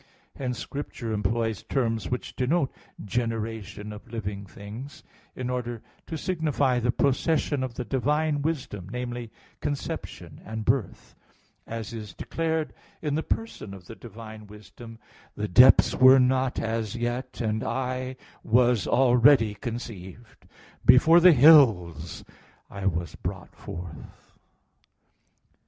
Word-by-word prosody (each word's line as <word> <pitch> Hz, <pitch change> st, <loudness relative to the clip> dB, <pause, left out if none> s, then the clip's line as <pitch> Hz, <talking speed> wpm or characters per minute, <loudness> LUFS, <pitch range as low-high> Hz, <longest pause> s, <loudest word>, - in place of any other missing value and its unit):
Hence 125 Hz, -3 st, -3 dB
Scripture 130 Hz, -5 st, -5 dB
employs 110 Hz, +1 st, -1 dB
terms 115 Hz, -6 st, -1 dB
which 125 Hz, -, -4 dB
denote 135 Hz, +2 st, +1 dB, 0.3 s
generation 110 Hz, -2 st, -3 dB
of 110 Hz, +3 st, -12 dB
living 100 Hz, -3 st, -5 dB
things 110 Hz, +9 st, -10 dB, 0.3 s
in 125 Hz, -, -4 dB
order 120 Hz, -2 st, -4 dB, 0.2 s
to 160 Hz, -, -4 dB
signify 150 Hz, -7 st, 0 dB
the 120 Hz, +1 st, -1 dB
procession 145 Hz, +2 st, +1 dB
of 130 Hz, -3 st, -4 dB
the 125 Hz, -, -4 dB
divine 145 Hz, +3 st, 0 dB
Wisdom, 130 Hz, -, -3 dB
namely, 120 Hz, -1 st, -5 dB, 0.3 s
conception 145 Hz, -1 st, -5 dB
and 110 Hz, -1 st, -6 dB
birth; 120 Hz, -6 st, -1 dB, 0.5 s
as 115 Hz, 0 st, -6 dB
is 105 Hz, -5 st, -8 dB
declared 160 Hz, -1 st, -2 dB, 0.3 s
in 150 Hz, -2 st, -1 dB
the 155 Hz, -, 0 dB
person 160 Hz, -, -4 dB
of 95 Hz, -2 st, -14 dB
the 115 Hz, -, -9 dB
divine 110 Hz, -1 st, -11 dB
Wisdom, 110 Hz, +2 st, -12 dB, 0.4 s
"The 105 Hz, 0 st, -3 dB
depths 125 Hz, +7 st, +7 dB
were 130 Hz, +1 st, +7 dB
not 130 Hz, 0 st, +2 dB
as 110 Hz, -2 st, -2 dB
yet, 120 Hz, +2 st, -3 dB
and 110 Hz, -2 st, -1 dB
I 130 Hz, +1 st, -3 dB, 0.3 s
was 120 Hz, -3 st, +3 dB
already 125 Hz, -2 st, +5 dB
conceived; 110 Hz, -1 st, -8 dB, 0.4 s
before 155 Hz, +8 st, +7 dB
the 180 Hz, +1 st, +8 dB
hills, 110 Hz, -, +5 dB, 0.5 s
I 100 Hz, -1 st, -3 dB
was 85 Hz, -3 st, -2 dB
brought -, -, -7 dB
forth." 85 Hz, -3 st, -10 dB
120 Hz, 120 wpm, -26 LUFS, 105-130 Hz, 0.5 s, the